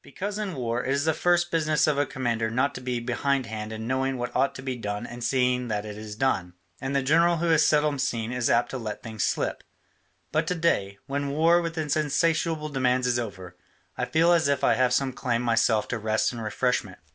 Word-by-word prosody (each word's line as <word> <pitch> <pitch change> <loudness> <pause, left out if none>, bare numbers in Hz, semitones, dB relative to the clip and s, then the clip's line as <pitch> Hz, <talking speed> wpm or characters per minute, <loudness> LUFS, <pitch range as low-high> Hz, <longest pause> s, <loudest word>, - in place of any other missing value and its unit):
Because 205 +2 -5
in 200 -5 -3
war 120 -1 -2
it 130 - -2
is 140 +2 +1
the 160 - +3
first 175 +2 +2
business 155 -3 +2
of 150 -2 +1
a 145 - +1
commander 115 -3 -1
not 130 +5 +1
to - - -7
be 125 -1 -2
behindhand 120 -3 -2
in 110 0 -5
knowing 130 +2 0
what 120 0 -4
ought 135 +2 +2
to 130 - -8
be 130 -1 -3
done 105 -1 -4
and 120 0 -8
seeing 125 0 +1
that 105 -2 -2
it 105 -1 -7
is 105 0 -8
done, 100 -8 0 0.3
and 135 +1 -2
the 140 - +2
general 165 +5 +4
who 170 +1 +1
is 160 - +5
seldom 150 -2 +2
seen 120 -4 -1
is 125 -2 0
apt 120 +1 +2
to 130 - -4
let 110 -2 -6
things 110 -4 -3
slip. - - -1 0.7
But 155 +1 0
to 180 - 0
day, 100 - 0
when 140 +1 -2
war 165 +4 +4
with 165 0 -4
its 150 -2 0
insatiable 155 +1 0
demands 130 -2 +1
is 125 -1 +1
over, 95 -6 -7 0.4
I - - -1
feel 165 +2 +3
as 165 -4 +3
if 140 -2 0
I - - +5
had 125 -1 +2
some 130 +1 +1
claim 125 -2 -1
myself 115 -2 +2
to 120 - -2
rest 110 +2 +1
and 115 -2 -6
refreshment. 110 -3 -1
130 Hz, 225 wpm, -26 LUFS, 115-150 Hz, 0.7 s, is